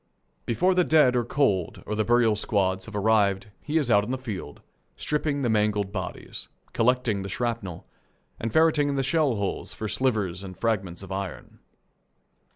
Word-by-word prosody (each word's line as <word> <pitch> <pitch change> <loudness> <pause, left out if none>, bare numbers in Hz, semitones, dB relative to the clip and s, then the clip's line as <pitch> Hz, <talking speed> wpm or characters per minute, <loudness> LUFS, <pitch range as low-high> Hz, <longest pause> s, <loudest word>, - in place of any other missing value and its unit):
Before 150 - +2
the 180 0 +3
dead 150 -7 +4
are 120 - +2
cold 105 - 0
or 105 - -3
the 110 0 +1
burial 120 -1 +3
squads 95 -2 0
have 110 - -8
arrived 105 -1 +2
he 155 +2 -1
is 140 -7 +1
out 100 -1 +5
on 105 - -6
the 130 - -1
field, 105 - -7 0.3
stripping 150 -2 -1
the - - +2
mangled 105 -2 +1
bodies, 95 -3 -6 0.2
collecting 120 -3 +2
the 95 - -5
shrapnel, 115 -6 -3 0.5
and 115 - -3
ferreting 155 0 +3
in 140 - -1
the 135 - 0
shell 140 -2 +2
holes 100 -2 -3
for 110 - -4
slivers 105 -7 0
and 95 -2 -9
fragments 95 -6 -1
of 95 - -10
iron. 95 -2 -6
110 Hz, 170 wpm, -26 LUFS, 100-130 Hz, 0.5 s, out